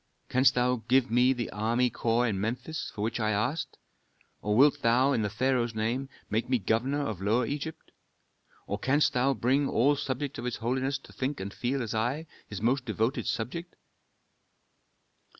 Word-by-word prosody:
Canst 130 0 +4
thou 125 0 +2
give 130 -1 +3
me 125 +2 +4
the 120 -3 -2
army 115 +4 +1
corps 115 +2 +1
in 100 -5 -1
Memphis, 125 +8 -3
for 105 - -3
which 115 +2 -1
I 110 -1 +1
asked, 110 +10 -1 0.6
or 105 0 0
wilt 145 +2 +5
thou, 125 +4 +4
in 115 - +1
the 105 - 0
pharaoh's 120 +1 0
name, 120 +5 -1 0.2
make 110 +4 -1
me 130 - +3
governor 120 +8 0
of 105 -7 -4
Lower 110 +5 +2
Egypt? 150 +5 -5 0.7
Or - - -3
canst 145 +3 +2
thou 130 +2 +2
bring 135 +4 +1
all 140 +5 +3
subjects 140 0 -3
of 120 - -5
his 125 - -2
holiness 130 +4 -1
to - - -17
think 135 +2 -2
and 100 +1 -5
feel 130 +1 -1
as 110 - -4
I, 120 +8 -1 0.2
his 100 0 -7
most 130 +3 +2
devoted 115 +1 -1
subject?" 170 +10 -3
125 Hz, 175 wpm, -29 LUFS, 115-135 Hz, 0.7 s, wilt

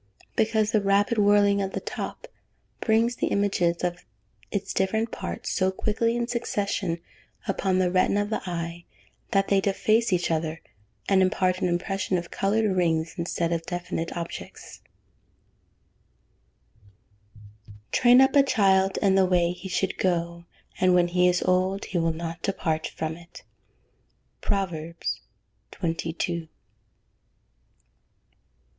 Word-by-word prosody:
_ - - -39
Because 220 -1 +2
the 215 -3 +3
rapid 200 +3 +2
whirling 205 -1 +4
of 195 0 -3
the - - -2
top - - -6 0.5
brings 230 +2 +2
the - - 0
images 180 -4 +1
of 175 0 -2 0.5
its 200 -1 -3
different 220 +4 0
parts - - -5
so 185 0 +2
quickly 225 +4 0
in 240 0 -1
succession 205 -7 -1 0.5
upon 190 -1 0
the 185 -1 +2
retina 185 +2 +2
of 205 - -7
the - - -1
eye, 170 0 -5 0.4
that 195 -1 +1
they 195 -1 +4
deface 215 +3 +2
each 175 -2 +1
other, 160 0 -1 0.5
and 195 -1 +4
impart 185 0 +1
an - - +2
impression 185 +2 -1
of 175 0 -6
coloured 205 0 +1
rings, 165 -3 +1
instead 170 -1 -1
of 165 -1 -2
definite 175 -2 -3
objects. 170 -1 -8 2.8
[Verse: 105 -1 -16 0.2
"Train 245 +1 +6
up 265 +2 +4
a 280 - +8
child 195 -7 +3
in 195 -1 +4
the 190 -1 +4
way 175 -1 +2
he 180 +2 -8
should 190 +1 -1
go; 170 -1 -1 0.3
and 185 -1 +4
when 175 -1 +3
he 180 +1 +3
is 180 0 +2
old, 185 +2 +1
he 180 - -2
will 165 0 +1
not 165 +1 -5
depart 160 -5 -1
from 160 0 -4
it." 170 0 -14 1.0
PROVERBS 170 -4 -2 0.5
XXII. 165 -1 -3
185 Hz, 135 wpm, -26 LUFS, 170-205 Hz, 2.8 s, a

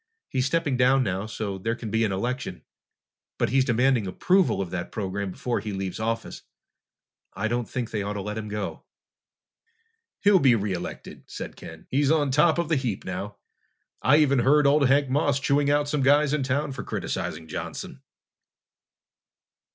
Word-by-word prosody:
He's 130 +1 0
stepping 145 -3 0
down 130 +1 +4
now, 95 0 -2
so 105 -3 -4
there 115 +4 -1
can 115 -3 -7
be 115 0 +2
an 105 - +1
election, 100 - -3 0.7
but - - +1
he's 135 +3 +3
demanding 125 -3 +2
approval 180 - +2
of 95 -3 -3
that 90 -1 -4
program 100 -1 -3
before 120 +6 -2
he 105 -2 -5
leaves 95 0 -4
office. 115 +1 -3 0.9
I 100 +4 -1
don't 120 +1 -2
think 125 -3 -4
they 105 - -1
ought 100 +1 -3
to 100 - -4
let 105 +2 -4
him 110 -1 -5
go." 105 -1 -5 1.4
"He'll 200 -1 +5
be 130 -5 +5
re 105 -3 -1
elected," 90 -1 -7
said - - -7
Ken. 80 -1 -11
"He's 140 +1 +2
on 150 -3 +2
top 150 +4 +4
of 170 -1 0
the 160 -2 +2
heap 120 -7 -3
now. 95 +3 -5 0.6
I 140 - +5
even 140 -4 +4
heard 145 +4 +4
old 140 0 +4
Hank 140 +2 +3
Moss 140 +1 +1
chewing 140 +1 +2
out 145 0 +2
some 145 -1 0
guys 145 +2 +4
in 150 - +1
town 140 +2 -1
for 130 -1 -5
criticizing 80 - -4
Johnson!" 80 - -6
125 Hz, 175 wpm, -25 LUFS, 105-140 Hz, 1.4 s, He'll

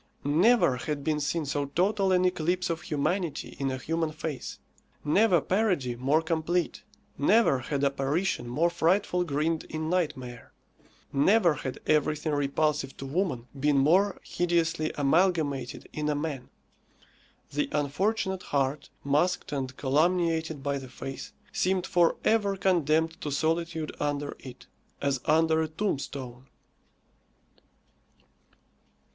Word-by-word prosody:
Never 165 - +4
had 145 +2 -4
been 150 0 0
seen 150 +2 -1
so 145 0 -1
total 195 +5 +1
an 185 0 +3
eclipse 180 0 0
of 165 0 -3
humanity 160 +3 -2
in 135 -1 0
a 130 - -2
human 160 +4 -2
face; 155 -2 -5 0.5
never 185 +4 +4
parody 180 - 0
more 140 +6 +1
complete; 165 +1 -1 0.4
never 195 - +4
had 140 +2 -3
apparition 140 +2 0
more 160 +8 +1
frightful 180 +2 +1
grinned 155 +1 -1
in 155 +1 -4
nightmare; 130 -9 -3 0.6
never 175 +5 +4
had 130 -2 -5
everything 150 0 +1
repulsive 145 0 0
to 135 - -7
woman 140 -5 -1
been 145 0 +2
more 180 +9 +3
hideously 165 -3 0
amalgamated 145 -3 +1
in 150 0 -2
a 150 - +1
man. 145 -4 -4 1.0
The 145 +1 -1
unfortunate 190 +6 0
heart, 140 -1 -1
masked 150 +6 +1
and 130 -2 -3
calumniated 160 +1 +1
by 140 0 -1
the 130 -1 -10
face, 135 +2 -7 0.2
seemed 185 0 0
for 175 -3 +3
ever 205 -3 +2
condemned 165 -3 +1
to 150 - -3
solitude 160 +1 -1
under 145 0 -2
it, 130 -2 -11 0.3
as 140 -3 0
under 160 0 +3
a 160 - 0
tombstone. 140 -7 -4
155 Hz, 125 wpm, -28 LUFS, 140-175 Hz, 1.0 s, Never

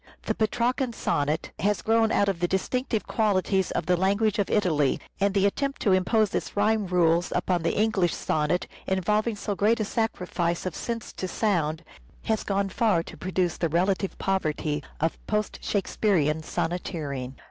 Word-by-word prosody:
The - - 0
Petrarcan 240 +3 0
sonnet 155 -5 -1
has 205 +1 +1
grown 225 0 +3
out 200 - +3
of 195 -4 0
the 175 - +1
distinctive 225 +5 -1
qualities 195 -3 +1
of - - -2
the 180 - +3
language 200 +4 +1
of 200 - +1
Italy, 155 -9 +2 0.2
and 200 0 +1
the 200 0 +4
attempt 275 +7 -1
to 205 - +3
impose 195 +3 +2
its - - -3
rhyme 210 0 +2
rules 175 -1 +2
upon 180 -2 +1
the 165 0 0
English 210 -6 +2
sonnet, 155 +3 0 0.2
involving 210 +4 +1
so 205 0 -3
great 215 +4 +2
a 215 - 0
sacrifice 180 -7 -1
of 185 - -2
sense 230 -2 -4
to 185 - -4
sound, 170 -6 0 0.4
has 220 -1 0
gone 195 0 0
far 195 -5 +2
to - - -10
produce 185 -2 -1
the 165 - 0
relative 185 +4 0
poverty 155 -5 -1 0.2
of 165 +1 -1
post 210 0 -1
Shakespearean 180 -6 +1
sonneteering. 150 -6 -3
190 Hz, 165 wpm, -26 LUFS, 170-215 Hz, 0.4 s, the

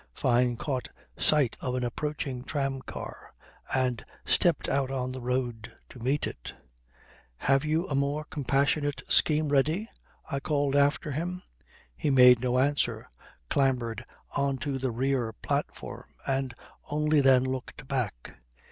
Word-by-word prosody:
Fyne 125 -1 +2
caught 130 -2 -3 0.3
sight 145 -6 +3
of 125 -1 -2
an 125 - -1
approaching 135 0 -3
tram 135 -1 -1
car - - -9 0.4
and 125 -2 +1 0.2
stepped 170 -5 +2
out 135 -1 +1
on 130 -1 -2
the 130 0 -6
road 120 -3 -2
to 125 - -12
meet 135 +5 0
it. - - -7 0.8
"Have 135 - +2
you 160 +4 0
a - - -3
more 140 +2 0
compassionate 145 0 0
scheme 155 -1 +3
ready?" 155 +9 +2 0.4
I 140 - -2
called 145 -1 0
after 145 +1 +2
him. 175 +5 -3 0.5
He 145 - -1
made 125 -3 +8
no 125 0 +1
answer, 140 +2 +1 0.4
clambered 125 - 0 0.3
on 140 -1 +1
to 135 -2 -1
the 130 0 -1
rear 125 -1 0
platform, - - -4 0.2
and 135 -2 -1 0.3
only 150 0 +3
then 130 -2 +6
looked 130 +1 -5
back. 125 - -3
135 Hz, 140 wpm, -28 LUFS, 125-145 Hz, 0.8 s, made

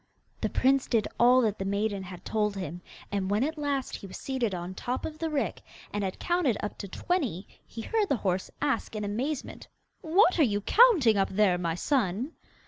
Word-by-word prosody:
The - - 0
prince 270 +1 +2
did 225 -4 +1
all 250 +2 +6
that 215 -3 0
the - - -1
maiden 200 +1 -1
had 180 -1 -10
told 210 -2 0
him, 180 -2 -5 0.3
and 195 -2 -1
when 210 +4 +2
at 315 +3 -1
last 285 -3 -2
he 195 - -10
was 190 - -8
seated 260 -5 -2
on 175 +1 -5
top 245 +6 -3
of 310 0 -6
the 325 0 -1
rick, 295 -3 -2 0.3
and 205 0 -1
had 190 -1 -3
counted 345 - +1
up 210 - -4
to 200 - -5
twenty, 255 - -2 0.2
he 225 - -7
heard 435 - 0
the 280 - +3
horse 185 0 0
ask 275 -6 -1
in 210 - -3
amazement: 250 +8 -3 0.3
'What 355 +2 +4
are - - +7
you 205 -5 +1
counting 330 - +5
up 195 - +2
there, 190 -2 +2
my 165 -2 -1
son? 240 - 0
220 Hz, 205 wpm, -28 LUFS, 195-285 Hz, 0.3 s, are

